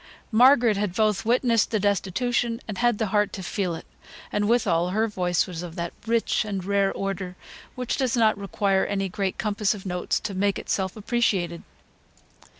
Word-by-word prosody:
Margaret 240 Hz, -2 st, +5 dB
had 200 Hz, -3 st, -2 dB
both 215 Hz, -1 st, +1 dB
witnessed 235 Hz, -2 st, +3 dB
the 215 Hz, -, 0 dB
destitution, 230 Hz, +4 st, 0 dB
and 210 Hz, -3 st, -5 dB
had 240 Hz, -2 st, +2 dB
the 220 Hz, -, 0 dB
heart 210 Hz, -1 st, +2 dB
to 190 Hz, -, -6 dB
feel 180 Hz, -2 st, -2 dB
it; -, -, -9 dB, 0.5 s
and 205 Hz, 0 st, 0 dB
withal, 180 Hz, -8 st, +2 dB
her 215 Hz, +4 st, +1 dB
voice 180 Hz, -4 st, 0 dB
was 175 Hz, -3 st, -6 dB
of 175 Hz, -2 st, -8 dB
that 170 Hz, 0 st, -4 dB
rich 230 Hz, 0 st, +1 dB
and 195 Hz, -4 st, -4 dB
rare 200 Hz, 0 st, +2 dB
order, 195 Hz, -2 st, -4 dB, 0.4 s
which 250 Hz, -2 st, -2 dB
does 255 Hz, -2 st, 0 dB
not 220 Hz, -2 st, +4 dB
require 200 Hz, -1 st, 0 dB
any 195 Hz, -1 st, -1 dB
great 190 Hz, +1 st, -2 dB
compass 210 Hz, -1 st, 0 dB
of 200 Hz, -, -10 dB
notes 180 Hz, -1 st, -1 dB
to 205 Hz, -, -4 dB
make 200 Hz, +1 st, +1 dB
itself 190 Hz, -2 st, -2 dB
appreciated. 200 Hz, -7 st, 0 dB
205 Hz, 175 wpm, -25 LUFS, 190-225 Hz, 0.5 s, Margaret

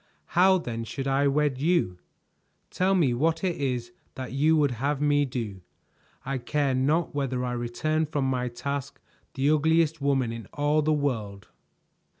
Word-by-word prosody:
How 190 Hz, +2 st, +5 dB
then 115 Hz, -9 st, -4 dB
should 135 Hz, +4 st, -5 dB
I 135 Hz, +1 st, +2 dB
wed 140 Hz, -2 st, +1 dB
you? 155 Hz, -, +1 dB, 0.7 s
Tell 190 Hz, +1 st, +2 dB
me 150 Hz, -9 st, +3 dB
what 160 Hz, +7 st, 0 dB
it 180 Hz, -3 st, 0 dB
is 125 Hz, -4 st, -2 dB, 0.2 s
that 130 Hz, -1 st, -6 dB
you 155 Hz, +5 st, +3 dB
would 145 Hz, -3 st, +3 dB
have 135 Hz, +4 st, -1 dB
me 145 Hz, -1 st, +3 dB
do; 115 Hz, -7 st, -5 dB, 0.6 s
I 135 Hz, 0 st, -2 dB
care 140 Hz, +2 st, 0 dB
not 150 Hz, +6 st, +1 dB
whether 130 Hz, -3 st, -1 dB
I 125 Hz, -, -2 dB
return 125 Hz, +7 st, -1 dB
from 145 Hz, -3 st, -1 dB
my 125 Hz, -1 st, 0 dB
task 140 Hz, +3 st, -5 dB, 0.4 s
the 135 Hz, +1 st, +1 dB
ugliest 160 Hz, 0 st, +2 dB
woman 135 Hz, -4 st, +1 dB
in 115 Hz, -3 st, -7 dB
all 150 Hz, +1 st, +2 dB
the 155 Hz, +1 st, +1 dB
world!" 110 Hz, -9 st, -2 dB
140 Hz, 160 wpm, -26 LUFS, 125-155 Hz, 0.7 s, How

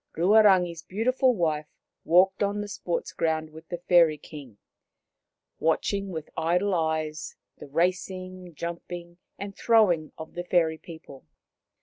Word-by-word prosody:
Ruarangi' 190 Hz, -1 st, +5 dB
s 165 Hz, -1 st, -10 dB
beautiful 250 Hz, +7 st, +1 dB
wife 155 Hz, -5 st, -1 dB, 0.4 s
walked 190 Hz, +3 st, +4 dB
on 205 Hz, 0 st, 0 dB
the 205 Hz, -, -4 dB
sports 175 Hz, -4 st, -4 dB
ground 160 Hz, -1 st, -1 dB
with 160 Hz, +1 st, -13 dB
the 175 Hz, -, -3 dB
Fairy 170 Hz, -3 st, +4 dB
King, 140 Hz, -7 st, -12 dB, 1.0 s
watching 195 Hz, +5 st, 0 dB
with 160 Hz, -4 st, -6 dB
idle 180 Hz, +5 st, +1 dB
eyes 160 Hz, -2 st, -2 dB, 0.2 s
the -, -, -9 dB
racing, 185 Hz, +2 st, -2 dB
jumping 170 Hz, +1 st, -7 dB, 0.2 s
and 200 Hz, 0 st, -7 dB
throwing 190 Hz, -9 st, +3 dB
of 160 Hz, -, -9 dB
the 175 Hz, -, -4 dB
fairy 165 Hz, -3 st, +1 dB
people. 160 Hz, -, -12 dB
175 Hz, 130 wpm, -26 LUFS, 160-190 Hz, 1.0 s, Ruarangi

